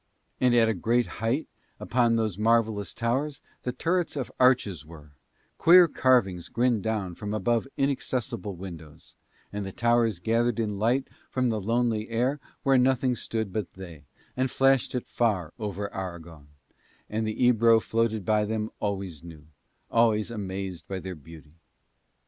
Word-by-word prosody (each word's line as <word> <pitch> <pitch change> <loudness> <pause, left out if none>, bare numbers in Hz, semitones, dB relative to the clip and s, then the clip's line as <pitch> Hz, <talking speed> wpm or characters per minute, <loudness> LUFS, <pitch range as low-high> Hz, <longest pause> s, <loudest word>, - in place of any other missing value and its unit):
And 125 -1 +3
at 110 -6 +3
great 120 +1 +2 0.2
height 120 +8 0 0.3
upon 120 -2 +2
those 110 -4 0
marvellous 110 -1 +1
towers 130 +5 -1 0.2
the 125 - -2
turrets 170 +5 -1
of 135 -4 -4
arches 125 -9 +3
were; 75 -2 -14 0.5
queer 175 +1 +8
carvings 110 - +2
grinned 120 -3 +1
down 105 -5 -2
from 105 +4 -5
above 115 +4 0
inaccessible 125 -7 -2
windows; 80 -4 -10 0.4
and 105 0 -3
the 95 - -5
towers 120 -2 +2
gathered 115 +5 +1
in 105 -3 -2
light 125 +5 +1 0.2
from 130 -1 0
the 110 -2 -1
lonely 115 +1 0
air 125 +5 0 0.2
where 135 -3 +4
nothing 130 0 +2
stood 110 -5 -3
but 105 -3 -3
they, 85 -6 -11 0.3
and 130 +1 0
flashed 135 -1 +2
it 125 - -2
far 100 -9 0
over 100 -1 -4
Aragon; 85 -5 -7 0.6
and 110 +1 -2
the 110 - -4
Ebro 115 -1 +5
floated 110 -2 -1
by 105 +1 +2
them 110 0 -2
always 95 -6 -3
new, 80 -3 -12 0.5
always 115 -1 +2
amazed 95 -5 -5
by 95 - -4
their 95 0 -6
beauty. 80 -1 -14
110 Hz, 150 wpm, -27 LUFS, 95-120 Hz, 0.6 s, queer